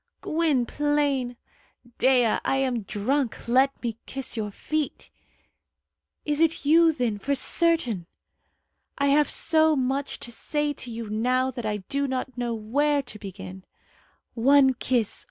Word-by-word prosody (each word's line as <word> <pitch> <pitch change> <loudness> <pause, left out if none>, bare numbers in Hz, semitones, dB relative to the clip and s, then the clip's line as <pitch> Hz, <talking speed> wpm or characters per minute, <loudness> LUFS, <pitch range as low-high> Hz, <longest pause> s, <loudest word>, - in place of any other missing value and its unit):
"Gwynplaine!" 290 -3 0 0.6
"Dea, 250 -4 +3
I - - +1
am 255 -3 0
drunk. 235 +7 -2
Let 260 +3 +2
me 230 -2 -3
kiss 270 -2 -4
your 215 -2 -3
feet." 305 +8 -4 1.1
"Is 295 -1 -1
it 330 -2 +1
you, 325 +2 +6
then, 245 -8 -2
for 280 +7 -1
certain?" 255 - +1 0.9
"I 280 0 +2
have 295 +1 +3
so 315 -1 +3
much 270 +1 -2
to 240 - -7
say 295 +5 -1
to 255 - -7
you 230 -1 -6
now 250 +5 0
that 240 -3 -5
I 210 -1 -1
do 280 0 -1
not 260 -1 -4
know 240 -2 -2
where 285 +7 +1
to 235 -4 -11
begin." 190 -1 -9 0.7
"One 265 +2 +5
kiss!" 245 -3 0
260 Hz, 135 wpm, -25 LUFS, 230-290 Hz, 1.1 s, you